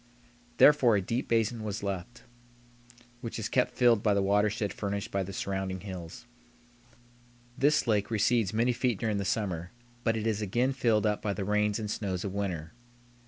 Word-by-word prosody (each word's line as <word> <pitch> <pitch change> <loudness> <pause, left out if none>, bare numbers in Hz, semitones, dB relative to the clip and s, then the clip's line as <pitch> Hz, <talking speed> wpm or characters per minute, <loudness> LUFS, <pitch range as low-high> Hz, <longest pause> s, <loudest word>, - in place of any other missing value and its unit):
Therefore 135 -7 +6
a 100 - +2
deep 115 +7 -2
basin 115 0 0
was 105 -1 -4
left, 100 +4 -5 1.0
which 115 -2 -6
is 110 - -2
kept 125 - +1
filled 120 -4 +4
by 105 -2 +2
the 100 - +2
watershed 105 +1 +1
furnished 100 +1 -4
by 100 - 0
the 95 +1 -5
surrounding 95 -1 -3
hills. 90 0 -8 1.3
This 145 +4 +3
lake 105 -4 +1
recedes 110 -1 +2
many 115 +3 +2
feet 120 -2 0
during 110 -2 0
the 100 - -2
summer, 90 -4 -2 0.3
but 115 -2 +1
it 110 - -3
is 110 -2 0
again 120 +6 +1
filled 115 -5 +2
up 105 -1 0
by 105 - -1
the 100 -1 -4
rains 105 0 +1
and 105 -2 -4
snows 95 -4 -3
of 95 - -4
winter. 90 -6 -3
105 Hz, 175 wpm, -29 LUFS, 100-115 Hz, 1.3 s, Therefore